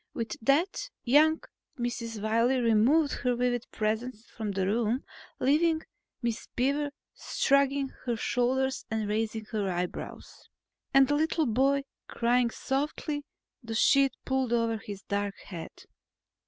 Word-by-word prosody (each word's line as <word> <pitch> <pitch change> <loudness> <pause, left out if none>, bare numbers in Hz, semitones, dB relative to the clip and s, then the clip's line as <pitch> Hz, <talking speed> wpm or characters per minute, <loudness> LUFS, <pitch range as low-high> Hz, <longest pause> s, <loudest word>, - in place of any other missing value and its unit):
With 230 -2 -3
that, 325 - +1
young 305 +5 +4 0.3
Mrs. 230 -3 -3
Wiley 230 +4 +3
removed 245 +7 +4
her 250 -2 +1
vivid 245 -1 0
presence 220 +2 -2
from 220 -2 -3
the 195 -1 0
room, 230 +5 +1 0.4
leaving 315 +4 +3 0.4
Miss 235 -1 -2
Beaver 280 +3 +1 0.3
shrugging 275 0 +2 0.2
her 240 - +1
shoulders 260 +3 0
and 220 -1 -1
raising 220 +1 -1
her 205 -3 -1
eyebrows. 180 0 -5 0.4
And 270 -1 +6
the 290 - +1
little 315 +1 +1
boy 270 +4 +2 0.2
crying 240 +1 +2
softly, 290 +3 -2 0.4
the 225 -2 -5
sheet 275 +3 +4
pulled 265 -2 0
over 230 -1 +1
his 200 -1 -8
dark 200 0 -2
head. 170 -4 -9
245 Hz, 125 wpm, -29 LUFS, 220-275 Hz, 0.4 s, And